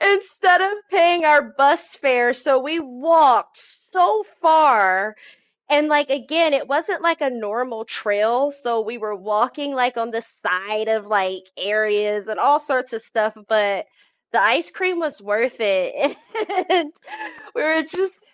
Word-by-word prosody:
instead 390 -2 +4
of 390 - 0 0.2
paying 345 -3 +4
our 295 -1 +7
bus 285 +4 +1
fare," 245 -3 +2
so 265 +1 +1
we 300 +6 -3
walked 290 0 +3 0.3
so 370 +4 +3
far, 225 - +3 0.5
and, 295 +1 +3
like, 295 -2 +2
again, 290 +4 +1
it 275 - 0
wasn't 325 +6 -2
like 335 -2 0
a 275 - 0
normal 230 0 -6
trail, 225 +8 -1
so 240 -5 -3
we 225 +2 -7
were 215 -2 -6
walking, 240 +8 -3
like, 250 -1 0
on 230 0 -4
the 230 0 -4
side 215 +2 -4
of, 220 -2 -1
like, 190 -3 -2
areas 210 0 -1
and 215 -1 -6
all 295 +2 +4
sorts 260 -3 -3
of 225 -1 -7
stuff, 220 -1 -2
but 205 -3 0 0.5
the - - +3
ice 335 - +2
cream 370 -2 -2
was 300 -10 -5
worth 220 +4 -2
it, 220 +9 -1 0.5
and 340 -4 +1 0.6
we - - -2
were 320 +1 +2
just 375 +6 -4
260 Hz, 155 wpm, -20 LUFS, 215-315 Hz, 0.6 s, our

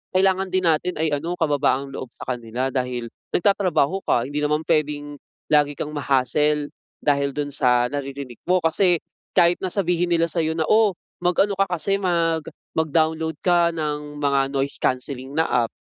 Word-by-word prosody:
kailangan 190 0 +3
din 185 0 0
natin 170 +2 +1
ay 160 0 0
ano, 165 +5 -2
kababaang 145 -4 +1
loob 130 - -6
sa - - -5
kanila 120 +2 -3
dahil 125 -2 -3 0.2
nagtatrabaho 185 -3 +2
ka. 120 - +3
Hindi 145 +4 -3
naman 150 +1 0
pwedeng 145 -2 0 0.3
lagi 145 -1 +4
kang 150 - -4
ma-hassle 145 +1 +1 0.3
dahil 140 -1 +1
dun 145 -1 -2
sa 125 -3 +2
naririnig 140 -3 -5
mo. 180 0 +3
Kasi 175 +2 +3 0.4
kahit 175 0 +5
na 190 - -2
sabihin 175 -3 +1
nila 165 0 +3
sa'yo 160 0 0
na, 160 - +1
"Oh, 215 -2 +4 0.3
mag-ano 180 +3 +2
ka 195 - +3
kasi 185 +3 0
mag 165 -4 0 0.3
mag-download 160 0 +1
ka 175 -2 +3
ng 150 -1 -4
mga 140 -1 +2
noise 135 0 0
cancelling 130 +1 -2
na 160 - +3 0.2
app, - - -10
150 Hz, 165 wpm, -23 LUFS, 140-175 Hz, 0.4 s, kahit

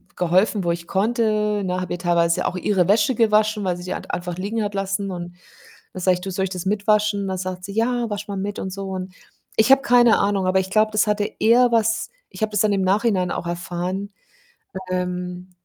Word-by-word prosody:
geholfen, 185 +4 +2
wo 170 - +1
ich 170 0 -5
konnte, 210 0 +1
ne? 185 -1 -1
Habe 185 - -4
ihr 175 - -4
teilweise 170 -1 +1
auch - - -3
ihre 180 -1 +1
Wäsche 210 +5 +3
gewaschen, 215 -2 +2
weil 180 -2 -1
sie 175 - -9
die 180 - -4
halt - - -7
einfach 175 -1 -4
liegen 215 +4 -2
hat 205 0 -3
lassen, 195 0 -2
und 175 -1 -7 0.6
dann 185 - -6
sage 185 0 +3
ich: 180 - -7
„Du, 190 - -5
soll 190 +1 -1
ich - - -4
das 180 -1 -5
mit 205 +2 -1
waschen“? 210 -2 +2
Dann 190 -1 -2
sagt 185 0 -5
sie:„ 200 - -7
Ja, 235 +2 0
wasch 205 0 -5
mal 200 - -4
mit.“ 200 +1 -4
und 190 - -5
so. 195 -1 -5 0.6
Ich 220 +4 +4
habe 270 0 +7
keine 240 -3 +5
Ahnung, 200 -2 +1
aber 185 +1 +3
ich 190 0 -4
glaube, 215 +1 +3
das 215 0 +2
hatte 210 -1 0
eher 240 +3 +5
was 225 -1 +1 0.2
ich - - -12
habe 215 - +1
das 210 - 0
dann 210 -1 +2
im 195 - +1
Nachhinein 190 -1 +1
auch - - -4
erfahren, 180 +3 -4 0.8
ähm, 180 0 -4
195 Hz, 225 wpm, -22 LUFS, 180-215 Hz, 0.8 s, habe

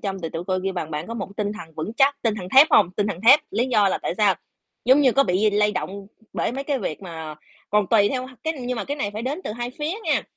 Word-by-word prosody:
trong 195 -1 -3
thì 165 - -2
tụi 165 - -4
tôi 185 -1 0
kêu 195 - -1
bằng 175 -4 -4
bạn 150 +2 -4
có 230 - -6
một 230 - -4
cái 195 - -16
tinh 205 -1 -1
thần 165 -7 -11
vững 160 +7 -4
chắc, 280 +2 +3
tinh 225 -3 +1
thần 185 -4 -7
thép 285 +4 +10
hông? 185 -4 +5
Tinh 205 +2 -1
thần 200 -4 -4
thép, 280 +4 +9
lý 245 +3 0
do 210 -6 +3
là - - -1
tại - - -3
sao? 205 -3 +3 0.5
Giống 260 +4 +5
như 265 -4 +4
có 275 +3 +4
bị 200 +3 +2
lay 210 0 +2
động 200 -1 -5 0.3
bởi - - -1
mấy 275 +2 -4
cái 280 -1 -1
việc 190 -4 -5
mà 160 -3 -7 0.4
còn 210 -1 +2
tùy 205 -3 +4
theo 255 -1 -3 0.2
cái, 320 - 0
nhưng 250 0 -3
mà - - -3
cái 285 - -4
này 205 -8 -2
phải 215 +2 -5
đến 280 +8 -3
từ - - -3
hai 240 +2 -4
phía 300 +2 -2
nha, - - +1
210 Hz, 295 wpm, -23 LUFS, 190-255 Hz, 0.5 s, thép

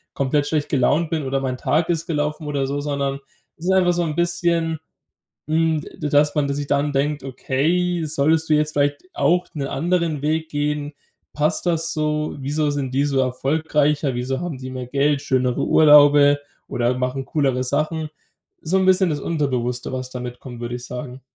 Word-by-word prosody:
komplett 140 +2 +1
schlecht 145 0 -1
gelaunt 145 +4 +2
bin 155 -3 -1
oder 135 +1 -1
mein 130 -1 -2
Tag 150 +6 0
ist 165 -1 0
gelaufen 150 -1 -2
oder 140 -2 -1
so, 140 +1 -2
sondern 140 -1 -2 0.4
es 165 - -10
ist 190 - +2
einfach 185 -2 +4
so 175 - 0
'n 155 -3 -3
bisschen, 170 -1 0 0.7
hm, 160 0 +1
d 150 - -6
dass 145 0 +3
man 145 -2 +1
dass 140 - -1
sich 145 - -3
dann 145 +1 +1
denkt: 145 +1 0
„Okay, 165 +7 0
solltest 155 +2 +1
du 155 - +4
jetzt 150 0 +1
vielleicht 145 0 0
auch 180 +1 +2
'ne 140 -3 -4
anderen 165 0 0
Weg 160 +1 0
gehen? 145 0 -2 0.4
Passt 150 +4 0
das 165 -1 0
so? 150 0 -1
Wieso 145 +2 0
sind 135 -3 -3
die 140 +2 +2
so 140 -2 0
erfolgreicher? 145 +2 0
Wieso 125 +2 -2
haben 175 -6 -4
die 130 0 -7
mehr 130 -1 -5
Geld, 140 +2 +1
schönere 125 -2 0
Urlaube 145 -1 +6 0.3
oder 120 +1 0
machen 130 +1 -2
coolere 135 -5 0
Sachen?" 155 +4 -1 0.5
So 180 +5 +1
'n 190 - +1
bisschen 185 -1 +4
das 145 -2 -2
Unterbewusste, 130 -6 -2
was 130 0 -4
da 125 - -6
mitkommt, 125 0 -8
würde 120 0 -4
ich 125 0 -9
sagen. 125 +1 -7
145 Hz, 185 wpm, -21 LUFS, 135-160 Hz, 0.7 s, Urlaube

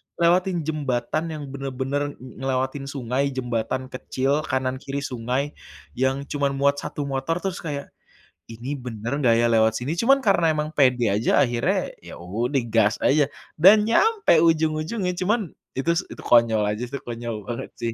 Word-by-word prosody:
lewatin 175 +1 +2
jembatan 145 -2 -1
yang 150 -1 -6
bener-bener 135 +1 -3
ng 130 0 -13
ngelewatin 130 +1 -2
sungai 135 0 -1
jembatan 125 +1 -2
kecil 135 +3 -1
kanan 130 -1 -1
kiri 140 +1 -4
sungai, 130 +3 -2 0.5
yang 130 +2 +1
cuman 140 -1 -1
muat 140 +1 +2
1 150 0 -4
motor 135 +3 -2
terus 190 -2 -2
kayak, 145 -3 -5 0.6
"Ini 120 +6 -5
bener 120 -2 -4
nggak 115 -2 +5
ya 120 - +3
lewat 110 -1 +3
sini?" 135 +7 -2
Cuman 265 +9 +4
karena 195 -9 +3
emang 150 0 -1
pede 125 -4 +3
aja 110 +4 +2
akhirnya 120 -2 +1 0.2
ya - - -10
udah 115 +10 -1
gas 110 -1 +2
aja 145 0 +3 0.2
dan 210 +6 +6
nyampe 415 - +4
ujung-ujungnya, 160 +4 +1
cuman 195 0 -1 0.2
itu 135 +5 +1
s - - +1 0.2
konyol 115 -3 +4
aja 110 +3 -5
sih, 125 - -6
itu 140 - -4
konyol 120 -1 -4
banget 120 -1 -5
sih. 115 -1 -2
135 Hz, 160 wpm, -24 LUFS, 120-155 Hz, 0.6 s, dan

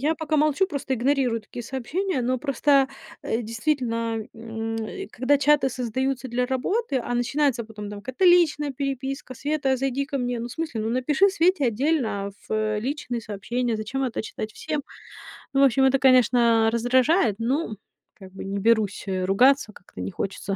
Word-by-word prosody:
Я 310 +4 +1
пока 315 -1 -1
молчу, 305 +5 +3
просто 280 -6 -3
игнорирую 255 -2 +1
такие 240 +3 -9
сообщения, 270 - -2
но 255 +1 0
просто, 275 0 +3 0.4
э, 230 +2 -1
действительно, 230 -1 -1
м, 225 0 -5
э, 385 - -5
когда 260 +4 +1
чаты 290 -1 +4
создаются 255 +1 -2
для 250 +1 0
работы, 275 - -1
а, 245 - -3
начинается 250 0 +1
потом 210 -2 -8
там 205 - -7
какая-то 260 - -2
личная 320 -5 +4
переписка: 270 -1 -4
"Света, 285 0 -1
а, 260 - +2
зайди 270 +1 -1
ко 290 - -3
мне". 245 -2 -2
Ну, 235 - -4
в 245 - -8
смысле, 310 -7 -3
ну, 220 - -2
напиши 275 +10 +3
Свете 365 -4 +2
отдельно, 265 +3 +1 0.2
а, - - -5 0.2
фэ 215 -1 0
личные 245 0 -3
сообщения, 230 +3 -2
зачем 260 +6 -3
это 245 - -2
читать 215 0 -6
всем? 300 +2 -3 0.7
Ну 275 - +3
в - - +7
общем, 265 0 +4
это, 265 +1 +4
конечно, 240 -3 +4
раздражает. 245 - +3
Ну, 235 -1 -1 0.4
как 190 -2 -14
бы 195 - -7
не 200 +1 -3
берусь, 220 -1 +1
э, 185 -1 -1
ругаться, 245 +5 +4
как-то 135 - -12
не 95 - -4
хочется 195 - -4
255 Hz, 180 wpm, -24 LUFS, 225-280 Hz, 0.7 s, в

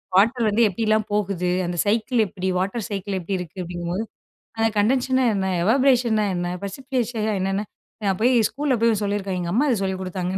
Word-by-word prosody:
Water 230 +4 +4
வந்து 215 +3 +2
எப்படிலாம் 215 +2 +1
போகுது, 195 -3 0 0.2
அந்த 175 0 -3
சைக்கிள் 225 +3 +2
எப்படி 190 +1 -5
வாட்டர் 195 +3 -2
சைக்கிள் 200 -1 -3
எப்படி 190 +3 -3
இருக்கு 180 +1 -8
அப்படிங்கும்போது, 175 +3 -3 0.5
அந்த 225 0 +3
கண்டன்ஷேஷன் 255 +4 +2
ன - - +3
என்ன? 190 -1 -1 0.2
எவாபரேஷன் 245 0 +3
ன - - +2
என்ன? 175 0 -2
பிரசிபிடேஷன் 240 0 -2
என்னென்ன 195 +2 -1 0.4
நான் 190 -2 +1
போய் 250 +2 +4 0.2
ஸ்கூல்ல 285 -1 -1
போய் 225 -3 +3
சொல்லியிருக்கான், 200 -2 -2
எங்க 170 0 -3
அம்மா 285 +6 +3
அத 240 - +3
சொல்லிக் 190 0 -3
குடுத்தாங்கன்னு 185 0 -3
205 Hz, 180 wpm, -23 LUFS, 190-235 Hz, 0.5 s, வாட்டர்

